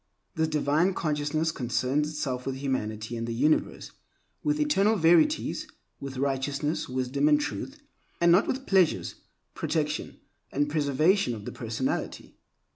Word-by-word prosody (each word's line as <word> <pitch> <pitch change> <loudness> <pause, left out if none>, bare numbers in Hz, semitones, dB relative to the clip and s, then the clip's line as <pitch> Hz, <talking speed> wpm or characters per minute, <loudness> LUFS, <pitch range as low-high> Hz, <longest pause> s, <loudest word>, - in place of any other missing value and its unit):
This 160 0 +1
divine 155 +4 +1
consciousness 155 +1 0
concerns 130 +2 0
itself 135 -5 -3
with 135 - -2
humanity 115 -5 -3
and 115 0 -4
the 115 - -3
universe, 150 +6 +1 0.5
with 300 0 0
eternal 225 -8 +3
verities, 175 - +3 0.3
with 135 -1 -7
righteousness, 140 +3 -1
wisdom, 130 +3 0
and 150 -1 +5
truth, 275 - -5 0.4
and 170 0 +5
not 185 +5 +5
with 265 +1 -2
pleasures, 185 -4 +2 0.4
protection, - - -2 0.3
and 145 +1 0
preservation 155 - +2
of 105 -2 -9
the - - -5
personality. 115 +2 -3
145 Hz, 130 wpm, -27 LUFS, 130-165 Hz, 0.5 s, and